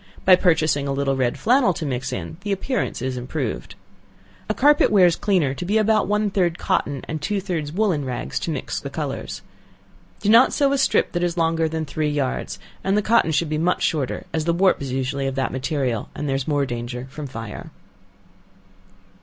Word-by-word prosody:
By 185 Hz, -, +8 dB
purchasing 155 Hz, -6 st, +2 dB
a -, -, -1 dB
little 135 Hz, 0 st, 0 dB
red 125 Hz, -2 st, 0 dB
flannel 240 Hz, -6 st, +3 dB
to 155 Hz, -, -4 dB
mix 130 Hz, -2 st, -3 dB
in, 90 Hz, -, -5 dB
the 205 Hz, +1 st, -4 dB
appearance 200 Hz, -, -2 dB
is 130 Hz, -1 st, -2 dB
improved. 125 Hz, -, -4 dB, 0.7 s
A -, -, +2 dB
carpet 290 Hz, +2 st, +5 dB
wears 180 Hz, -5 st, +5 dB
cleaner 180 Hz, -10 st, +1 dB
to 140 Hz, -, -6 dB
be 200 Hz, +5 st, +1 dB
about 215 Hz, -1 st, +3 dB
one 210 Hz, 0 st, +1 dB
third 175 Hz, -4 st, +1 dB
cotton, 140 Hz, -2 st, -1 dB
and 155 Hz, -1 st, -4 dB
two 205 Hz, +6 st, -1 dB
thirds 170 Hz, -6 st, -3 dB
woollen 180 Hz, -5 st, +1 dB
rags 125 Hz, -, -3 dB
to -, -, -4 dB
mix -, -, -3 dB
the -, -, -6 dB
colors. -, -, -5 dB, 0.8 s
Do -, -, -4 dB
not 230 Hz, +4 st, +6 dB
sew 280 Hz, -2 st, +2 dB
a 280 Hz, -, +1 dB
strip 270 Hz, -, +2 dB
that 175 Hz, -, -2 dB
is 175 Hz, 0 st, -1 dB
longer 165 Hz, -1 st, +1 dB
than 160 Hz, 0 st, -3 dB
three 155 Hz, +1 st, -1 dB
yards, 145 Hz, -3 st, -2 dB, 0.3 s
and 195 Hz, +2 st, +1 dB
the 210 Hz, -, +1 dB
cotton 225 Hz, -6 st, +3 dB
should 155 Hz, +2 st, +1 dB
be 155 Hz, 0 st, -2 dB
much 175 Hz, +3 st, +1 dB
shorter, 145 Hz, -6 st, -1 dB
as 160 Hz, -1 st, -1 dB
the 170 Hz, -, +2 dB
warp 185 Hz, -2 st, +3 dB
is 135 Hz, -2 st, -4 dB
usually 135 Hz, +1 st, -1 dB
of 135 Hz, -, -3 dB
that 135 Hz, -1 st, -1 dB
material, 130 Hz, -3 st, -2 dB
there 145 Hz, -2 st, -2 dB
is 135 Hz, -1 st, -3 dB
more 145 Hz, -2 st, +1 dB
danger 120 Hz, 0 st, -5 dB
from 150 Hz, 0 st, -6 dB
fire. 115 Hz, +6 st, -7 dB
155 Hz, 200 wpm, -22 LUFS, 135-190 Hz, 0.8 s, By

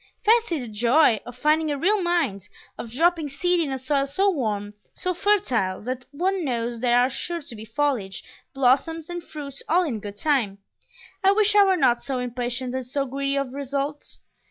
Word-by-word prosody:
Fancy 440 Hz, -7 st, +3 dB
the 245 Hz, -, -6 dB
joy 235 Hz, +3 st, +3 dB
of 245 Hz, 0 st, -9 dB
finding 305 Hz, +3 st, +2 dB
a 290 Hz, -, -1 dB
real 390 Hz, +8 st, +2 dB
mind; 275 Hz, -, -1 dB, 0.3 s
of 235 Hz, -, -7 dB
dropping 325 Hz, +4 st, +1 dB
seed 355 Hz, +5 st, +1 dB
in 320 Hz, -4 st, 0 dB
a 265 Hz, -, -2 dB
soil 275 Hz, +2 st, 0 dB
so 390 Hz, +8 st, +2 dB
warm, 210 Hz, -, -2 dB, 0.2 s
so 365 Hz, -, -1 dB
fertile, 325 Hz, -, +1 dB
that 250 Hz, +1 st, -4 dB
one 365 Hz, +5 st, -1 dB
knows 235 Hz, -3 st, -2 dB
there 240 Hz, 0 st, +3 dB
are 245 Hz, +1 st, +5 dB
sure 340 Hz, +6 st, -4 dB
to 280 Hz, -7 st, -10 dB
be 215 Hz, 0 st, -9 dB
foliage, 225 Hz, -5 st, -1 dB, 0.3 s
blossoms, 275 Hz, +5 st, +1 dB
and 350 Hz, -1 st, -5 dB
fruit 285 Hz, -4 st, -7 dB
all 355 Hz, +3 st, +4 dB
in 255 Hz, -10 st, -3 dB
good 205 Hz, 0 st, -8 dB
time! 240 Hz, -8 st, +1 dB, 0.7 s
I 390 Hz, +1 st, +6 dB
wish 420 Hz, 0 st, +2 dB
I 410 Hz, -, +8 dB
were 380 Hz, -2 st, +3 dB
not 250 Hz, -6 st, +3 dB
so 270 Hz, -2 st, -3 dB
impatient 250 Hz, +1 st, -3 dB
and 260 Hz, 0 st, -2 dB
so 275 Hz, +3 st, -2 dB
greedy 275 Hz, +1 st, -2 dB
of 275 Hz, -2 st, -2 dB
results! 280 Hz, +1 st, -4 dB
275 Hz, 190 wpm, -24 LUFS, 245-335 Hz, 0.7 s, I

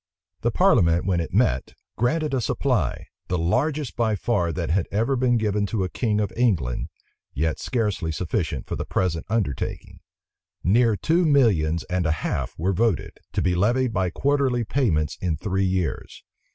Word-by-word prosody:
The -, -, +2 dB
parliament, 85 Hz, +1 st, +3 dB
when 90 Hz, -3 st, +1 dB
it 85 Hz, -, -3 dB
met, 65 Hz, +1 st, +1 dB, 0.2 s
granted 150 Hz, +6 st, 0 dB
a 130 Hz, -, +1 dB
supply, 115 Hz, -, 0 dB, 0.2 s
the 90 Hz, -, 0 dB
largest 135 Hz, -, 0 dB
by 110 Hz, -2 st, +1 dB
far 100 Hz, -5 st, 0 dB
that 85 Hz, 0 st, -3 dB
had 90 Hz, 0 st, +1 dB
ever 115 Hz, +7 st, +1 dB
been 125 Hz, -1 st, +2 dB
given 105 Hz, -2 st, 0 dB
to 100 Hz, -1 st, -1 dB
a 90 Hz, -, -2 dB
king 105 Hz, -1 st, 0 dB
of 105 Hz, -2 st, -1 dB
England, 90 Hz, -, 0 dB, 0.5 s
yet 80 Hz, +2 st, 0 dB
scarcely 105 Hz, -9 st, -1 dB
sufficient 80 Hz, -, -2 dB
for -, -, -4 dB
the -, -, -3 dB
present 85 Hz, -3 st, -1 dB
undertaking. 100 Hz, -, -2 dB, 0.6 s
Near 115 Hz, +4 st, +3 dB
two 165 Hz, -, +2 dB
millions 100 Hz, -, +3 dB
and 90 Hz, -2 st, -1 dB
a -, -, +2 dB
half 65 Hz, -2 st, -2 dB
were 95 Hz, +5 st, 0 dB
voted, 110 Hz, 0 st, 0 dB
to -, -, 0 dB
be 90 Hz, -, +2 dB
levied 120 Hz, +7 st, +1 dB
by 95 Hz, -2 st, +1 dB
quarterly 135 Hz, +2 st, +1 dB
payments 105 Hz, -, 0 dB
in 85 Hz, -4 st, -1 dB
three 95 Hz, +4 st, -1 dB
years. 90 Hz, -3 st, -3 dB
100 Hz, 165 wpm, -24 LUFS, 85-120 Hz, 0.6 s, parliament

